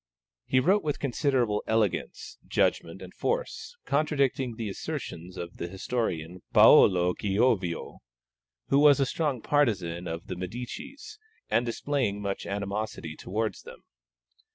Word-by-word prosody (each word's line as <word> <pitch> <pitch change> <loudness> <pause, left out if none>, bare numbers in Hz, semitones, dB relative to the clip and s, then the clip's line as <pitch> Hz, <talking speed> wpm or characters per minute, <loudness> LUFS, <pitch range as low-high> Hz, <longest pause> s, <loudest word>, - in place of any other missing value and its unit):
He 130 - +3
wrote 190 +10 +3
with 150 -2 -1
considerable 130 -5 0
elegance, 110 -3 -1
judgment, 85 +3 0
and 90 - -11
force, - - -3
contradicting 140 -4 0
the 115 -1 -4
assertions 90 -2 -6
of 85 0 -7
the 85 - -4
historian 90 -3 -3
Paolo 90 -2 +7
Giovio, 100 -3 0 0.7
who 140 - +4
was 145 -2 +6
a 135 - +3
strong 140 -4 -2
partisan 90 - +1
of 80 +1 -5
the - - -5
Medicis, 235 - -7 0.3
and 120 +1 +2
displaying 120 -4 -1
much 100 -1 -4
animosity 100 -5 -4
towards 110 +6 -3
them. - - -13
110 Hz, 125 wpm, -28 LUFS, 90-140 Hz, 0.7 s, Paolo